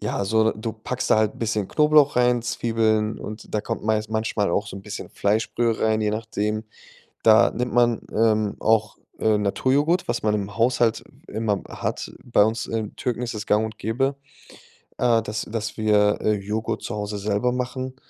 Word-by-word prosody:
ja, 100 - -2
so, 110 +2 +3
du 110 +1 -5
packst 120 +3 -4
da - - +6
halt 110 -1 +1
'n - - -15
bisschen 105 -3 -1
Knoblauch 150 -2 +4
rein, 125 -1 +3
Zwiebeln 110 -2 0
und 105 +1 -8
da 105 - +2
kommt 105 - -5
meis 110 -1 0
manchmal 110 -3 -1
auch 100 +4 0
so 100 - -7
'n 95 - -9
bisschen 105 +1 -7
Fleischbrühe 110 +2 0
rein, 110 0 +2
je 105 -1 +1
nachdem. 110 0 -2 0.6
Da - - +6
nimmt 125 0 -3
man, 120 -1 +3
ähm, 110 -2 +2
auch, 110 -1 +2 0.2
äh, 110 -1 +2
Naturjoghurt, 140 - +1
was 120 0 -1
man 105 0 +1
im 100 -1 -3
Haushalt 120 -1 +2 0.2
w - - -13
immer 105 -2 -1
hat. - - -4
Bei 115 -4 +4
uns, 110 +1 -1
äh, 110 -2 -2
Türken 120 -1 -2
ist 120 -1 -3
das 105 0 -5
gang 105 +1 +3
und 110 0 -6
gäbe, 135 +6 -1 0.8
äh, 120 -2 +3
dass 105 0 -4
dass 110 -1 -5
wir, 105 -1 +3
äh, 110 - +2
Joghurt 105 +2 -3
zu - - -4
Hause 105 0 -4
selber 105 +4 0
machen, 130 +1 -4
110 Hz, 190 wpm, -23 LUFS, 105-120 Hz, 0.8 s, da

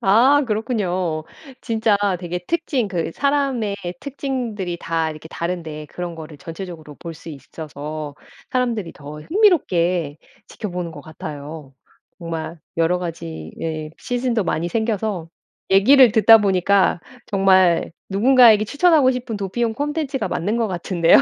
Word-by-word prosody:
아 250 +9 +5
그렇군요. 185 -8 -1 0.4
진짜 220 -3 +1 0.2
되게 175 0 -4
특징 295 -9 0
그 170 -3 -2
사람의 275 -7 0 0.2
특징들이 245 -10 -3
다 165 -1 -1
이렇게 155 +1 -10
다른데 165 -3 -4
그런 175 +2 -6
거를 155 -2 -10
전체적으로 165 -1 -8
볼 170 -1 -7
수 165 - -12
있 - - -6
있어서 150 0 -7 0.4
사람들이 240 -8 -1
더 150 +1 -10
흥미롭게 180 - +2 0.3
지켜보는 180 -4 -5
것 150 - -9
같아요. 150 -2 -8 0.5
정말 165 -1 -5 0.2
여러 165 +2 +2
가지 80 - -6
예 155 -1 -4
시즌도 245 -2 -1
많이 170 0 -1
생겨서 215 -4 -2 0.4
얘기를 245 +6 +7
듣다 225 0 +8
보니까 195 -2 +3 0.3
정말 190 -4 +3 0.2
누군가에게 225 +1 +6
추천하고 290 +1 +4
싶은 245 -3 -4
도피용 220 +4 -1
콘텐츠가 290 -1 -2
맞는 205 +7 -1
것 230 -1 +1
같은데요. 175 -2 +3
185 Hz, 305 characters per minute, -21 LUFS, 165-235 Hz, 0.5 s, 듣다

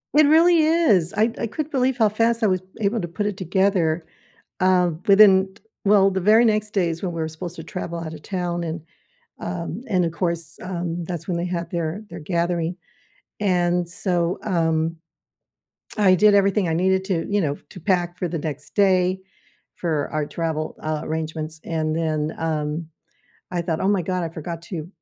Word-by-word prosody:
It 305 0 +7
really 325 +2 +5
is. 310 - +3
I 220 +2 +2
I - - -2
couldn't 305 +7 -4
believe 260 -2 +1
how 220 -3 +4
fast 230 +2 +1
I - - +5
was 185 -2 +1 0.2
able 215 +1 0
to 175 - -3
put 205 +5 -3
it 205 -2 -2
together, 185 -3 +1 0.5
uh, 185 -2 +3 0.2
within 195 -2 +6
t - - -21 0.2
well, 195 -1 +5
the 190 - -1
very 215 +5 +6
next 215 -1 +1
day 185 -5 +1
is 165 0 -4
when 180 -2 -2
we 165 - -3
were 160 - -1
supposed 170 +2 -7
to 160 - -7
travel 170 -1 -5
out 160 -1 -6
of 155 - -10
town, 175 -1 -3
and 165 0 -4 0.6
um, 175 +4 -4
and 185 -4 +2
of 165 - -1
course, 170 -2 -3
um, 175 -2 -3
that's 175 0 -6
when 180 - 0
they 170 - -1
had 170 -2 -3
their 170 +3 -3
their 170 0 -8
gathering, 170 +1 -1 0.6
and 175 -3 +1
so, 175 -1 -1
um, 165 -3 0 1.0
I 195 -3 +6
did 205 +3 +5
everything 200 -1 +3
I 160 - +1
needed 190 +2 +2
to 175 -5 -1
you 205 0 +1
know, 145 -5 -1
to 185 - -10
pack 175 -1 0
for 180 - -1
the 165 -1 -3
next 150 -1 -6
day 185 -2 +3 0.6
for 155 -4 -1
our 155 -1 -1
travel, 160 -1 -3
uh, 155 -1 -2
arrangements, 155 0 -4
and 155 -1 -1
then, 155 -1 -1
um, 155 0 -2 0.6
I 175 - 0
thought, 165 -2 -2
"Oh 190 - +1
my 200 -3 +2
god, 185 0 -2
I - - -2
forgot 165 +1 -6
to 170 -3 -6
175 Hz, 190 wpm, -23 LUFS, 165-195 Hz, 1.0 s, It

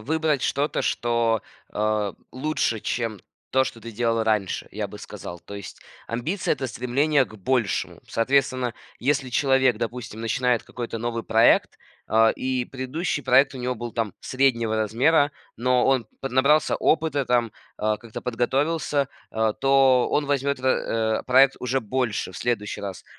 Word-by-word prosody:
выбрать 155 +3 0
что-то, 145 +2 0
что, 115 -2 +1 0.3
а, 105 -1 0 0.2
лучше, 130 -5 -1
чем 115 -2 -2 0.3
то, 130 0 +3
что 115 - -7
ты 115 +1 -8
делал 115 0 +1
раньше, 105 -4 0
я - - -3
бы - - -10
сказал. 85 - -8
То 100 - -10
есть 100 - -9 0.3
амбиция- 155 +12 -1
это 135 -2 -2
стремление 135 +4 +1
к 110 - -14
большему. 115 +1 -1
Соответственно, 130 0 +1 0.3
если 135 0 0
человек, 130 -1 +3
допустим, 115 -1 -5
начинает 120 +1 +1
какой-то 120 -2 -6
новый 115 0 -3
проект, 115 +1 +4 0.3
а, 110 0 +4
и 130 -1 -2
предыдущий 140 +4 -3
проект 130 +2 +4
у - - -6
него 125 0 -2
был 120 0 -6
там 110 -5 -2
среднего 115 -4 +1
размера, 135 +8 +3 0.2
но 125 +1 +2
он 130 -4 +2
поднабрался 135 +3 +3
опыта, 155 -4 +1
там, 120 -3 +1 0.2
а, 110 0 0
как-то 115 -2 -8
подготовился, 140 +4 0 0.2
а, 110 -1 +1
то 135 0 +4
он 150 - +1
возьмёт 140 0 0
в - - -10
э, 110 -4 +1
проект 130 +1 +5
уже 130 +2 -1
больше 120 -3 -2
в - - -8
следующий 115 -4 -2
раз. 100 -2 -6
125 Hz, 155 wpm, -24 LUFS, 115-135 Hz, 0.3 s, проект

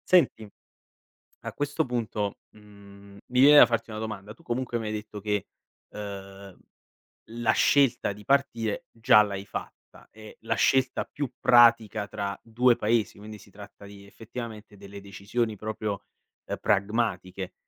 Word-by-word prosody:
Senti, 155 - +2 0.9
a - - -7
questo 145 +2 -1
punto, 110 -5 -3 0.2
mhmm, 100 -1 -16
mi 125 +1 +1
viene 145 +2 +8
da - - +10
farti 115 -1 -2
una 110 - -6
domanda: 105 -2 -6
tu - - -22
comunque 120 0 -3
mi 110 - -5
hai 105 - -3
detto 105 -1 -7
che, 105 -1 -2 0.4
ehm, 100 -2 -9 0.7
la 120 0 +1
scelta 135 -7 +3
di 105 +1 -14
partire 120 -6 0
già 110 -2 +5
l'hai 100 -1 -5
fatta, - - -10
e 110 0 -14
la - - -1
scelta 130 -1 +2
più 145 -4 -5
pratica 115 -3 +4
tra 100 -1 -5
2 120 +2 +2
Paesi, 110 0 0
quindi 105 +1 -10
si 100 - -17
tratta 100 0 -13
di 100 0 -13
effettivamente 110 -1 -9
delle 100 0 -11
decisioni 105 +3 -3
proprio, 105 -1 -4 0.4
uhm, - - -4
pragmatiche, 100 -3 -1
105 Hz, 145 wpm, -27 LUFS, 100-120 Hz, 0.9 s, da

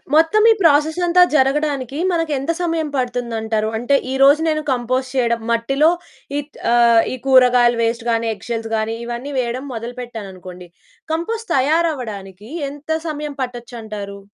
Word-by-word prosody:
మొత్తం 325 +7 +4
ఈ - - +7
ప్రాసెస్ 315 0 +3
అంతా 360 +1 +6
జరగడానికి 275 -1 +1
మనకెంత 315 -3 -1
సమయం 330 -2 -1
పడుతుందంటారు? 230 -4 -2
అంటే 245 +5 +1 0.2
ఈరోజు 275 +3 +5
నేను 310 0 0
కంపోస్ట్ 255 +1 -1
చేయడం. 235 -2 +1
మట్టిలో 270 +7 +2 0.5
ఈట్ 290 0 -7 0.2
ఆహ్, 235 -1 +5
ఈ - - -2
కూరగాయలు 250 -2 +5
వేస్ట్ 230 +1 -1
గానీ, 230 0 0
ఎగ్ 200 - -14
షెల్స్ 225 -1 -3
గానీ, 220 +1 -1
ఇవన్నీ 240 +4 -5
వేయడం 250 +2 -3
మొదలు 235 +1 -6
పెట్టాననుకోండి, 185 -6 -9 0.4
కంపోస్ట్ 450 +8 -3
తయారు 315 +6 +2
అవ్వడానికి 205 -5 -8 0.2
ఎంత 300 +3 -3
సమయం 300 -2 -4
పట్టచ్చంటారు? 225 -5 -7
250 Hz, 140 wpm, -19 LUFS, 230-295 Hz, 0.5 s, ఈ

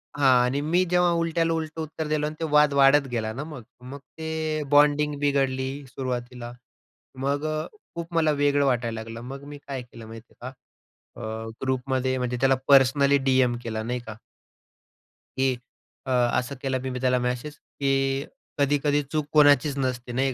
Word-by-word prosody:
हां 140 -2 +3 0.2
आणि 130 +3 0
मी 170 +5 +2
जेव्हा 180 0 +3
उलट्याला 165 0 +1
उलटं 160 0 -4
उत्तर 155 0 -5
दिलं 150 0 0
आणि 155 - -6
ते 165 - -1
वाद 150 -1 +5
वाढत 140 0 +5
गेला 110 -2 -2
ना 135 +6 -5
मग. 150 -6 -9 0.2
मग 135 +3 -9 0.2
ते 160 -1 -2
बॉन्डिंग 145 0 +4
बिघडली 135 -2 +1 0.2
सुरुवातीला. 125 -1 -5 0.7
मग 140 +2 0
अ, 155 0 -2 0.3
खूप 170 0 -6
मला 160 -2 +3
वेगळं 145 0 +3
वाटायला 120 -4 0
लागलं. 115 +1 -8
मग 135 +3 -8
मी - - -8
काय 135 -2 -4
केलं 115 -2 -12
माहिती 115 +1 -12
आहे 130 - -5 0.5
का, 110 0 -8
अ, 115 - -6
ग्रुपमध्ये 130 0 0
म्हणजे 125 -1 -2
त्याला 135 0 +4
पर्सनली 140 +1 +5
डीएम 130 -2 +3
केला, 110 -1 -3
नाही 125 +2 -2
का. 110 -1 -7 1.2
की 130 0 +2 0.5
अ, 130 - -1 0.3
असं 135 +3 -5
केला 135 -1 -1
मी 130 -1 -4
त्याला 125 -1 +2
मेसेज, 125 +4 -3 0.3
की 135 0 +1 0.3
कधी-कधी 145 +1 +2
चूक 155 -2 0
कोणाचीच 145 -2 +5
नसते, 125 -2 -2
नाही 130 +2 0
135 Hz, 165 wpm, -25 LUFS, 125-150 Hz, 1.2 s, वाद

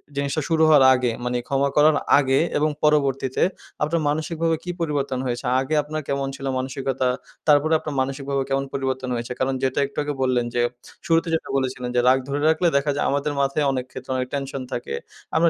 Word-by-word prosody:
জিনিসটা 140 +2 -1
শুরু 160 -1 +3
হওয়ার 150 -3 +7
আগে 125 -2 0
মানে 125 0 0
ক্ষমা 140 0 +1
করার 150 +1 +6 0.2
আগে 135 -1 +2 0.2
এবং 155 +1 +2
পরবর্তীতে 140 -3 +2 0.4
আপনার 160 +2 0
মানসিকভাবে 165 +2 0
কি 180 - -3
পরিবর্তন 140 -5 -1
হয়েছে? 120 -1 -3 0.2
আগে 140 +4 -1
আপনার 155 +1 -4
কেমন 140 0 -1
ছিল 135 0 -8
মানসিকতা? 130 0 -2 0.4
তারপরে 150 +1 +4
আপনার 150 -2 -5
মানসিকভাবে 135 +1 -2
কেমন 135 0 0
পরিবর্তন 130 -1 -2
হয়েছে? 120 +1 -5
কারণ 130 +1 +1
যেটা 130 0 +1
একটু 140 - -21
আগে 145 0 -2
বললেন 125 -2 +1
যে 120 - +3 0.4
শুরুতে 165 +1 +2
যেটা 160 - -4
বলেছিলেন 130 -2 -2
যে 120 - +4
রাগ 130 +1 +5
ধরে 145 +1 -1
রাখলে 160 +2 +2
দেখা 140 +1 +1
যায় - - 0
আমাদের 145 +1 -1
মাথায় 140 +2 +1
অনেক 130 -2 -2
ক্ষেত্রে 130 0 -8
অনেক 125 0 -2
টেনশন 135 -1 -3
থাকে। 120 - -4 0.4
আমরা 165 +1 +5
140 Hz, 190 wpm, -23 LUFS, 130-150 Hz, 0.4 s, হওয়ার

